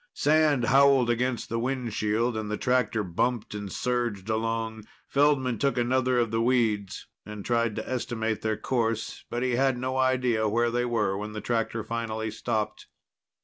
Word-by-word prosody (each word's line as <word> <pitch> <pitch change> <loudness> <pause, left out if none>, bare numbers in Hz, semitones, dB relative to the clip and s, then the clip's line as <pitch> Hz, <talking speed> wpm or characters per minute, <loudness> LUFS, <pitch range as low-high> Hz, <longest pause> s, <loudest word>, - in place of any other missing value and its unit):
Sand 150 -4 +3
howled 135 -2 +5
against 120 0 -1
the 115 - -2
windshield 120 -2 -1
and 110 -1 -3
the 105 - -2
tractor 125 -4 +1
bumped 105 +6 -1
and 105 -2 -5
surged 120 -5 -2
along. 110 0 -2 0.2
Feldman 135 -5 +2
took 140 -2 +1
another 130 +1 +2
of 115 -2 +1
the 115 0 +1
weeds 115 -5 0 0.2
and 105 -2 -8
tried 115 -2 +1
to - - -5
estimate 115 -4 -2
their 110 -1 -1
course. 115 -3 -2
But 120 +1 -2
he 125 -2 +1
had 135 -1 +2
no 130 +1 -2
idea 125 -4 +2
where 120 +2 +1
they 120 +1 0
were 110 -5 0
when 105 +1 -5
the 105 - -4
tractor 115 -1 -1
finally 110 -1 -3
stopped. 110 -1 -3
115 Hz, 165 wpm, -27 LUFS, 110-125 Hz, 0.2 s, howled